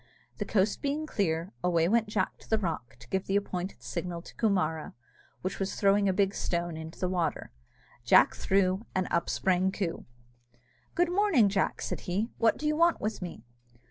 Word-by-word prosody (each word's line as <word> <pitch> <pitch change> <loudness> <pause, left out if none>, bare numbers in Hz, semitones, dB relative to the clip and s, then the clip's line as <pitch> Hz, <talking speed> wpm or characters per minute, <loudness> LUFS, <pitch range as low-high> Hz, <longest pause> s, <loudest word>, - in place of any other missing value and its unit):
The - - -1
coast 200 0 +1
being 290 +2 -1
clear, 180 - -1
away 170 -2 +3
went 225 +2 +2
Jack 210 - -1
to - - -18
the 220 - +3
rock 160 - -3
to 115 - -13
give 190 0 -1
the 195 - 0
appointed 185 - -2
signal 170 +8 -4
to - - -12
Coomara, 180 -8 0 0.5
which 185 - -3
was 195 0 -2
throwing 200 0 +3
a - - +4
big 195 +1 +1
stone 170 -3 -2
into 160 +1 -8
the 185 - -1
water. 175 - -1 0.5
Jack - - +6
threw, 190 +1 +1
and 185 -1 +1
up 170 0 +1
sprang 190 0 +2
Coo! 185 -4 -3 0.9
"Good 350 0 +2
morning, 360 - +4
Jack," 195 -1 0
said - - -3
he; 205 +7 -1
"what 230 - +3
do 300 - -6
you 300 0 +2
want 335 +1 +3
with 215 0 -3
me?" 175 -10 -7
190 Hz, 185 wpm, -29 LUFS, 175-215 Hz, 0.9 s, Jack